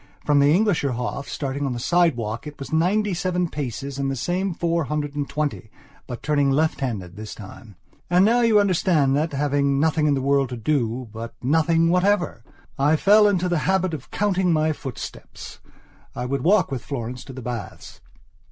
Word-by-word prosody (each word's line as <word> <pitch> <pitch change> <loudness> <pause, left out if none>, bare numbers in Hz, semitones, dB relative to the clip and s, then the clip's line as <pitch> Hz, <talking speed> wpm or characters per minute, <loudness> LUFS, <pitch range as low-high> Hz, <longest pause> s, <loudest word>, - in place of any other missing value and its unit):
From 145 -1 +4
the 140 +1 +5
Englischer 175 - +2
Hof, 140 +3 -4
starting 140 0 -3
on 135 -3 -1
the 120 - -4
sidewalk, 125 -6 0
it 150 - -9
was 140 - -8
ninety 195 +5 +2
seven 180 0 -1
paces 140 -1 -5
and 135 0 0
the 135 - -2
same 180 +9 -1
four 170 -1 -1
hundred 145 0 -3
and 145 -1 -3
twenty, 150 -7 -3 0.4
but 120 -2 -7
turning 145 -2 +2
lefthanded 130 - -1
this 105 +1 -8
time. 105 0 -12 0.3
And 180 +2 +5
now 235 +3 +3
you 225 -3 +5
understand 170 -8 +2
that, 155 +2 0
having 140 -1 +1
nothing 155 0 +2
in 145 - +3
the - - -1
world 140 -1 +2
to 125 - -5
dobut 115 -3 -2
nothing 165 +4 +3
whatever! 180 +1 +1 0.4
I 145 +3 +4
fell 210 +6 +5
into 185 -3 +1
the 175 -2 +1
habit 185 -2 +1
of 145 -5 -7
counting 190 -3 +1
my 155 -1 +2
footsteps. 135 -4 -9 0.6
I 125 - -3
would 135 +1 -2
walk 195 +1 +3
with 130 -4 -4
Florence 125 -2 -5
to 135 - -9
the 130 -1 -8
baths. 115 -4 -7
145 Hz, 180 wpm, -23 LUFS, 130-175 Hz, 0.6 s, the